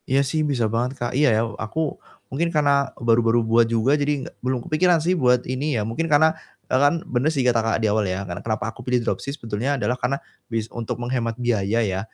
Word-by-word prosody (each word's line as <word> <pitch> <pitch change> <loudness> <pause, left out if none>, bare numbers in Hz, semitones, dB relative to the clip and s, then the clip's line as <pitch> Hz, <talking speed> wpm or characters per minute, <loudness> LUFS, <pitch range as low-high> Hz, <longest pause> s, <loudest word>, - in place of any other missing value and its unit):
Iya 135 +1 +3
sih 155 +3 -1
bisa 120 -4 +1
banget 120 +2 0
Kak. 120 -1 -3
Iya 150 +1 +4
ya - - +2 0.2
aku 115 +9 -4 0.5
mungkin 165 +6 0
karena 145 -1 +3 0.3
baru-baru 115 0 +3
buat 115 +1 +4
juga, 115 +4 +2
jadi 145 -2 0
nggak - - -11
belum 130 0 -1
kepikiran 175 +3 +3
sih 180 - +3
buat 125 -2 +3
ini 135 +3 -2
ya, - - 0
mungkin 135 +10 -2
karena 150 +1 +5 0.4
e - - -2
kan 145 - +5 0.2
benar 125 +4 +2
sih 135 - +1
kata 120 -2 +3
Kakak 115 0 0
di - - +3
awal 105 0 +1
ya, 95 +1 -2
karena 85 -1 -6
kenapa 110 +1 -2
aku - - -20
pilih 125 -1 +1
dropship 140 +4 -3
sebetulnya 115 +5 -2
adalah 125 -1 0
karena 125 +3 +1 0.3
bis 115 -2 -1
untuk 115 -2 -4
menghemat 120 -2 -2
biaya 115 -3 0
ya, 95 -2 -1
120 Hz, 225 wpm, -23 LUFS, 115-140 Hz, 0.5 s, karena